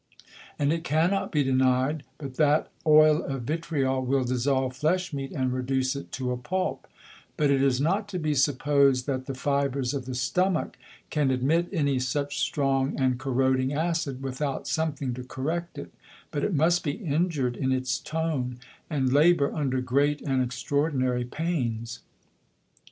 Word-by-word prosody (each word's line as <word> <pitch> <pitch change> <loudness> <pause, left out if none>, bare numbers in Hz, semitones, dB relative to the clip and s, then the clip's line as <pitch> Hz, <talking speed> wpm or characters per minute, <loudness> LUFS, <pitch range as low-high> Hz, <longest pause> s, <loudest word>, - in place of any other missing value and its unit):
And 145 +1 +2
it 165 0 -3
cannot 170 +5 +1
be 150 -3 +2
deny'd, 130 +2 +2 0.2
but 140 -4 -7
that 150 0 +3 0.2
Oil 155 +1 +6
of 135 -3 -4
Vitriol 140 -3 -1
will 130 +1 +1
dissolve 130 +1 0
Flesh 175 +5 0
meat, 135 -1 -4
and 130 -3 -1
reduce 130 +1 0
it 140 - -7
to 130 -1 -2
a 125 - -2
Pulp; 185 +9 -3 0.5
but 145 -2 +3
it 135 -1 +3
is 135 -2 +2
not 195 +8 +1
to 200 -2 -4
be 155 -3 -1
suppos'd, 140 -1 +3
that 130 -2 -3
the 135 - -4
Fibres 140 -1 0
of 135 -3 -3
the 130 - -4
Stomach 180 +7 0 0.4
can 150 -3 +1
admit 145 +7 +1
any 140 -8 +1
such 140 +3 -2
strong 135 0 0
and 130 -2 +1
corroding 130 0 +1
Acid, 155 -4 -1
without 135 +1 -3
something 150 -5 -1
to 125 +1 -6
correct 160 +7 -4
it, - - -8 0.4
but - - -2
it 200 - 0
must 170 +4 +3
be 145 - -1
injur'd 155 - -1
in 130 +1 -1
its 130 -1 0
Tone, 150 -6 -2 0.3
and 135 -5 0
labour 150 0 +4
under 130 -4 -1
great 140 +4 +1
and 135 -2 +1
extraordinary 130 -1 0
Pains. 120 -6 -3
140 Hz, 160 wpm, -27 LUFS, 130-155 Hz, 0.5 s, Oil